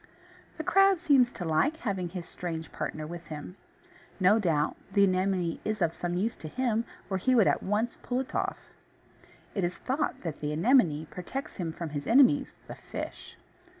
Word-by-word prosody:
The - - -3
crab 390 -1 +5
seems 275 -7 +4
to 175 - -5
like 170 - +2
having 190 - -2
his 180 -1 -6
strange 165 -2 -5
partner 155 0 -4
with 170 +1 -8
him. 155 +3 -7 0.6
No 200 +4 +5
doubt 160 -7 +1 0.2
the 200 0 +4
Anemone 185 -2 +1
is 215 0 -2
of 170 -3 +1
some 175 0 -3
use 215 +6 0
to 155 - -8
him, 235 +3 0 0.2
or 190 - -1
he 255 +7 +2
would 220 -5 +6
at - - +2
once 215 +4 -1
pull 250 0 -1
it 265 - -9
off. - - -1 1.0
It 195 - -1
is 175 +1 -1
thought 275 +4 -2
that 165 -4 -5
the 150 0 -2
Anemone 165 - +3
protects 265 +10 -6
him 170 -3 -2
from 165 0 -5
his 145 -1 -4
enemies, 270 +3 +5
the - - -8
fish. - - -8
190 Hz, 185 wpm, -29 LUFS, 165-245 Hz, 1.0 s, would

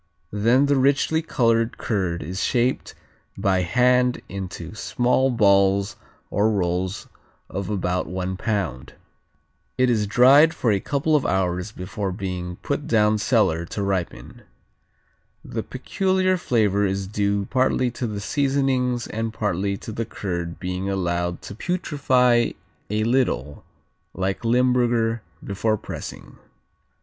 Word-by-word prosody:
Then 115 +7 +3
the 140 -1 +2
richly 140 +4 +2
colored 115 -7 +1
curd 90 -6 -2
is 90 +5 -4
shaped 125 +1 0 0.4
by 95 -1 +1
hand 125 +6 +2
into 90 -3 -6
small 125 +4 +1
balls 100 -4 +3 0.4
or 105 +2 +2
rolls 95 -1 -1 0.4
of 95 0 -4
about 90 -3 -1
one 95 +1 -3
pound. 95 - -3 0.8
It 130 -1 +3
is 105 -3 +1
dried 135 +8 +6
for 115 - +1
a 100 - +2
couple 145 +7 0
of 145 - +2
hours 90 +1 -1
before 95 +1 -4
being 90 -2 -4
put 145 0 -2
down 105 -1 +3
cellar 100 -8 +2
to 100 +3 -4
ripen. 95 -3 -3 1.0
The - - -4
peculiar 185 -1 0
flavor 110 - +1
is 95 0 -1
due 100 0 -1
partly 130 -1 +2
to 120 +1 -4
the 105 -2 -4
seasonings 135 -2 0
and 115 +1 -3
partly 100 -3 -1
to 110 - -8
the 115 +1 -3
curd 85 -5 -5
being 90 +1 -3
allowed 85 -2 -2
to - - -7
putrify 130 - +1 0.4
a 105 +1 0
little, 110 - 0 0.5
like 95 +4 -2
Limburger, 120 -1 +2 0.2
before 110 +2 0
pressing. - - -9
105 Hz, 125 wpm, -23 LUFS, 95-125 Hz, 1.0 s, dried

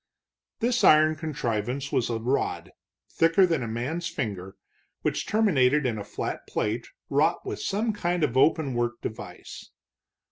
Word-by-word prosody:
This 240 +1 +1
iron 155 0 +6
contrivance 135 -4 -3
was 120 - +1
a 115 - -1
rod, 125 +5 -1
little - - -20 0.4
thicker 165 +4 +4
than 165 -6 0
a 115 - -3
man's 135 +10 -3
finger, 105 - -4 0.5
which - - -1
terminated 150 -10 +3
in 115 -4 -1
a - - -5
flat - - -5
plate 110 +3 -2 0.2
wrought 155 +5 +1
with - - -4
some 215 +3 0
kind 175 -4 -1
of 130 -5 0
open 145 0 +3
work 120 0 -1
device. 110 - -8
140 Hz, 150 wpm, -26 LUFS, 120-165 Hz, 0.5 s, iron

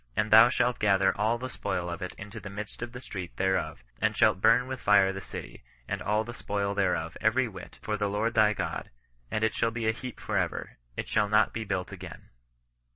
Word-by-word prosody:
And 110 0 0
thou 110 +2 +9
shalt 125 -2 +1
gather 95 -2 +3
all 115 +4 0
ike 130 - -5
spoil 90 -5 -3
of 85 -1 -5
it 90 - -5
into 105 +2 -8
the 100 -1 -8
midst 105 +3 -7
of 120 0 -4
the 125 +1 -8
street 95 -8 -7
there 95 0 +2
of, - - -7 0.2
and - - +1
shalt 95 - +4
bum 115 +3 +5
with 130 -1 -6
fire 100 -2 +5
the 95 - -6
city, - - -9 0.2
and - - -3
all 105 +1 +1
the 120 +2 -7
spoil 100 -3 -2
thereof 90 -4 0
every 120 +4 +3
whit, 95 -5 -10
for 105 -1 -1
the 105 -1 0
Lord 110 +3 0
thy 105 -1 +5
God: - - -4 0.4
and 110 - -1
it 110 - +2
shall 115 - +1
be 115 -1 -3
a - - +5
heap 125 +1 -8
for - - -1
ever; - - -3 0.2
it - - -3
shall 105 - +1
not 105 +1 +4
be 115 - -3
bmlt 95 -3 -3
again. - - -10
105 Hz, 230 wpm, -28 LUFS, 100-115 Hz, 0.4 s, thou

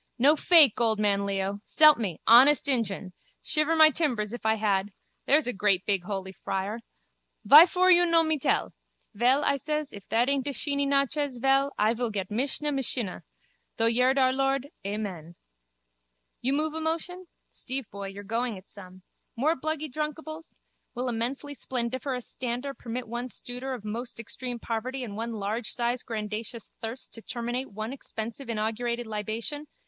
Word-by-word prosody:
No 280 +5 +5
fake, 305 - +6
old 220 -2 +3
man 200 -1 +1
Leo. 195 0 -2
S'elp 305 -4 +6
me, 195 -8 -3
honest 270 +6 +7
injun. 205 -8 +1 0.3
Shiver 305 +1 +2
my 315 -1 +8
timbers 240 -9 -1
if 240 -2 -4
I 220 - +3
had. 205 -2 0 0.4
There's 300 +2 +4
a 250 - -2
great 195 -1 +1
big 195 -4 0
holy 190 -1 -4
friar. 195 +3 -4 0.7
Vyfor 360 +5 +8
you 350 0 +5
no 335 -1 +4
me 315 -2 0
tell? - - 0 0.4
Vel, 250 +7 +3
I 280 - +2
ses, 300 +1 -3
if 200 -2 -11
that 235 +2 +2
aint 275 -1 0
a 285 - -2
sheeny 280 0 0
nachez, 280 -1 0
vel, 270 +2 +2
I 215 +2 +3
vil 240 0 -2
get 195 -3 -4
misha 275 +6 0
mishinnah. 250 -7 -2 0.6
Through 230 0 +3
yerd 255 +3 +3
our 260 -1 +4
lord, 270 +1 0
Amen. 195 -5 -5 1.1
You 265 +3 +1
move 305 +2 0
a 320 - -4
motion? 345 +3 -3 0.2
Steve 265 0 -5
boy, 200 -1 -6
you're 195 +1 -8
going 230 +1 -2
it 185 - -15
some. 185 -2 -12 0.3
More 300 +7 +1
bluggy 310 +2 -3
drunkables? 310 +2 -5 0.4
Will 250 +1 -2
immensely 250 +5 -3
splendiferous 255 0 -3
stander 250 +3 -4
permit 245 -1 -6
one 240 +2 -4
stooder 250 +2 -6
of 220 -4 -11
most 230 +3 -5
extreme 245 +2 -5
poverty 240 +3 -4
and 210 -4 -7
one 230 +2 -4
largesize 235 +3 -2
grandacious 220 +1 -5
thirst 230 +3 -6
to 225 - -8
terminate 240 +3 -4
one 215 +4 -5
expensive 235 -1 -7
inaugurated 235 +2 -2
libation? 220 +7 -4
245 Hz, 165 wpm, -27 LUFS, 215-280 Hz, 1.1 s, my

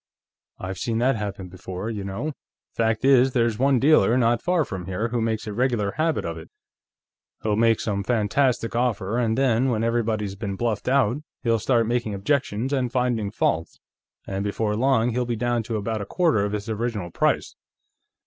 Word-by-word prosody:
I've 95 -1 -6
seen 115 -2 -1
that 125 +3 +2
happen 100 -3 -5
before, 95 +3 -6
you 105 -3 -4
know. 100 +11 -4 0.4
Fact 110 +1 +1
is, 135 -1 +5
there's 115 -3 +1
one 135 0 +4
dealer, 125 -4 +4
not 120 -1 +2
far 175 -4 +1
from 90 -2 -6
here, 95 +5 -2
who 120 0 -1
makes 110 -1 -1
a 105 - -5
regular 120 -3 0
habit 160 +3 0
of 85 -1 -4
it. 80 - -12 0.9
He'll 105 -1 +1
make 115 0 +3
some 100 -2 -2
fantastic 115 +2 +1
offer, 115 -2 0
and 115 -2 +1
then, 130 -1 +2
when 115 -2 0
everybody's 110 -3 0
been 100 -1 -4
bluffed 110 -1 -2
out, 130 -2 +3 0.3
he'll 115 -2 +2
start 115 +1 +2
making 115 -2 -1
objections 125 +3 -1
and 125 -3 0
finding 125 -5 0
faults, 85 -6 -1 0.5
and 95 0 -3
before 105 +1 -1
long 125 0 +2
he'll 125 +2 0
be 120 -1 -2
down 120 +1 0
to 110 0 -3
about 110 +1 -2
a - - -4
quarter 165 - +2
of 105 - -3
his 105 +1 -3
original 110 -5 -3
price." - - 0
115 Hz, 185 wpm, -24 LUFS, 105-125 Hz, 0.9 s, is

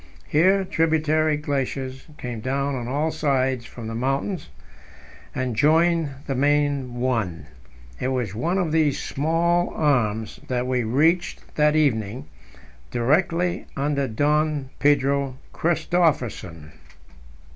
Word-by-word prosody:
Here 190 +5 +3
tributary 155 -2 +2
glaciers 135 -2 -3
came 120 -2 -5
down 140 +4 -1
on 120 -3 -4
all 150 +5 0
sides 130 -5 0
from 120 - -9
the 115 - -5
mountains 135 - -2 0.9
and 130 -3 -2
joined 165 +3 +3 0.2
the 135 - -2
main 140 -2 +1
one; 115 -9 -1 0.5
it - - -1
was 125 -6 -1
one 165 - -1
of 175 -5 0
these 160 0 +3
many - - -6
small 170 +4 +1
arms 110 -8 0
that 125 -1 -1
we 125 -1 0
reached 155 +10 +1
that 150 0 +3
evening, 125 -4 +1 0.6
directly 165 +8 +1
under 140 0 0
Don 145 +3 0
Pedro 140 -2 +2 0.2
Christophersen. 135 - 0
140 Hz, 115 wpm, -23 LUFS, 125-155 Hz, 0.9 s, Here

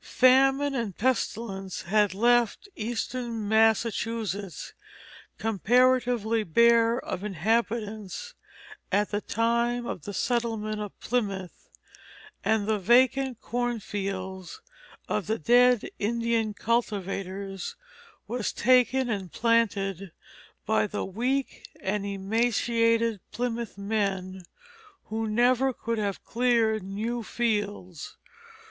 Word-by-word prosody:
Famine 270 +2 +4
and 230 -8 -3
pestilence 215 -6 -2
had 205 +1 +2
left 240 - +2
eastern 230 0 -3
Massachusetts 220 -2 0 0.6
comparatively 235 +1 +2
bare 230 +5 +4
of 185 -5 -5
inhabitants 215 - -2 0.6
at 205 +1 +1
the 205 0 -1
time 235 +2 0
of 180 - -5
the 205 - -7
settlement 225 -2 -1
of 205 -2 -7
Plymouth; 200 -7 -3 0.7
and 220 -2 +1
the 215 -1 +1
vacant 250 +4 +3
cornfields 200 - -4 0.5
of 210 -3 -2
the 220 +1 0
dead 245 +5 +4
Indian 230 0 0
cultivators 195 -4 -2 0.5
were 240 +3 -3
taken 255 +4 +3
and 195 -6 -3
planted 200 -5 0 0.5
by 105 -1 +2
the - - -3
weak 250 +8 -2
and 200 +1 -2
emaciated 230 +2 +1
Plymouth 235 -2 -3
men, 195 -3 -2 0.6
who 220 +1 -2
never 245 +4 +3
could 230 -2 -3
have 200 -2 -2
cleared 230 -3 +2
new 215 +5 -3
fields. 205 -8 -3
225 Hz, 95 wpm, -27 LUFS, 200-240 Hz, 0.7 s, Famine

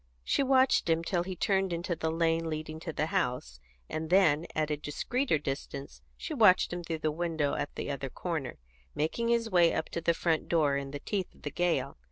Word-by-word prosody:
She - - +1
watched 265 -7 +3
him 165 0 +2
till 175 0 0
he 185 +1 -4
turned 195 +1 +1
into 170 +1 -2
the 160 0 -2
lane 165 0 +1
leading 155 0 -5
to 160 - -5
the 155 0 -1
house, 125 - -2 0.3
and 155 0 -4
then, 170 -4 +4
at 155 -1 0
a - - +2
discreeter 160 - -1
distance, 140 -1 -5 0.2
she 320 - -5
watched 210 -10 +5
him 175 0 -4
through 165 -1 -3
the 155 - +3
window 160 -3 -1
at 145 - -3
the - - -3
other 140 -1 -4
corner, 155 -4 -4 0.4
making 195 +10 -1
his 230 -1 +1
way 175 -2 +5
up - - -2
to 170 - -4
the 170 0 +2
front 165 -2 0
door 150 -4 +3
in 140 0 -3
the 145 +1 -6
teeth 195 -4 -3
of - - -22
the 145 - -3
gale. 175 +3 0
165 Hz, 215 wpm, -30 LUFS, 150-180 Hz, 0.4 s, watched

